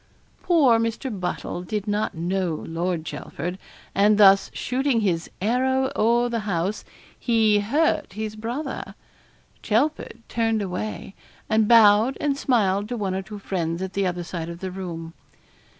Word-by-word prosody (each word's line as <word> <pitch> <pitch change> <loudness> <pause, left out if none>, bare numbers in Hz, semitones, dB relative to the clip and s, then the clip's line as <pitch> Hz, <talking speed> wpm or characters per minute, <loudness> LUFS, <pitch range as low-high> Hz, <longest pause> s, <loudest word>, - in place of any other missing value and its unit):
Poor 280 -10 +4
Mr. 230 -1 -3
Buttle 175 -1 -3
did 210 +3 -4
not 205 -1 -1
know 175 0 -1
Lord 170 0 -2
Chelford, 170 +4 -5 0.3
and 205 +1 +4
thus 195 -1 +6
shooting 255 -2 0
his 170 -5 -1
'arrow 260 +5 +1
o'er 235 +2 +3
the 235 -1 -2
house,' 195 -1 -2 0.4
he 220 -3 +3
'hurt 280 - 0
his 215 +1 -4
brother.' 235 +8 -5 0.7
Chelford 235 0 -1
turned 225 -2 0
away, 195 +2 -5 0.3
and 220 -1 +2
bowed 225 +2 +6
and 290 -2 0
smiled 210 -7 +1
to 245 - -3
one 195 -3 -2
or 190 - -2
two 210 +2 -9
friends 170 -4 -3
at 190 - -5
the 195 -1 0
other 180 -1 -3
side 170 -1 -5
of 170 0 -8
the 190 0 -5
room. 170 -3 -6
210 Hz, 150 wpm, -24 LUFS, 185-230 Hz, 0.7 s, thus